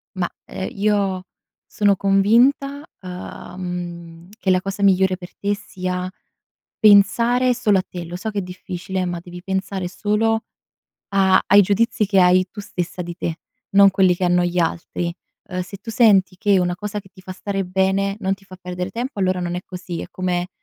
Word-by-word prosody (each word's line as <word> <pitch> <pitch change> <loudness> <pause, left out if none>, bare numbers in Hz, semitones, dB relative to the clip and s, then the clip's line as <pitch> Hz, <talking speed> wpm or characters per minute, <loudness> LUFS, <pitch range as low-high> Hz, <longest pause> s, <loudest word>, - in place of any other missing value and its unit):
Ma, 180 -2 -1 0.2
ehm, 190 - -5
io 200 -2 0 0.4
sono 205 -1 +2
convinta, 235 +9 +3 0.2
uhm, 180 -2 -7
che 195 - -1
la 185 0 +4
cosa 195 +1 -5
migliore 190 -1 +4
per 180 -1 -12
te 205 0 0
sia 185 -2 -4 0.7
pensare 230 +5 +5
solo 210 -4 +2
a - - +1
te. 175 -1 -6
Lo 170 +1 -6
so 200 +5 -4
che 205 - -4
è - - 0
difficile, 185 0 -5
ma 175 -1 -3
devi 175 0 -10
pensare 190 -1 -2
solo 220 +4 0 0.7
a 190 -1 +4
ai 205 +1 +7
giudizi 210 +3 +1
che 195 -1 +3
hai 180 +1 +5
tu 210 - -8
stessa 180 -3 -4
di 175 0 -6
te, 165 -2 -3 0.3
non 200 0 +7
quelli 190 -1 +4
che 185 - -1
hanno 180 0 +3
gli 175 0 -1
altri. 170 +1 -1 0.4
Ehm, 185 -1 -3
se 185 +2 -9
tu 215 +4 -8
senti 200 -5 +4
che 200 0 +3
una 175 -1 +1
cosa 210 +2 -4
che 195 - -19
ti - - -15
fa 185 0 -8
stare 195 0 -3
bene 190 +2 +1
non 195 -1 0
ti 195 0 -22
fa 185 -1 -12
perdere 180 0 -4
tempo, 240 +3 -5
allora 185 -1 +1
non 175 -1 -2
è 180 - -2
così. 180 -2 -6
È - - -6
come 180 -1 -2
190 Hz, 185 wpm, -21 LUFS, 180-205 Hz, 0.7 s, ai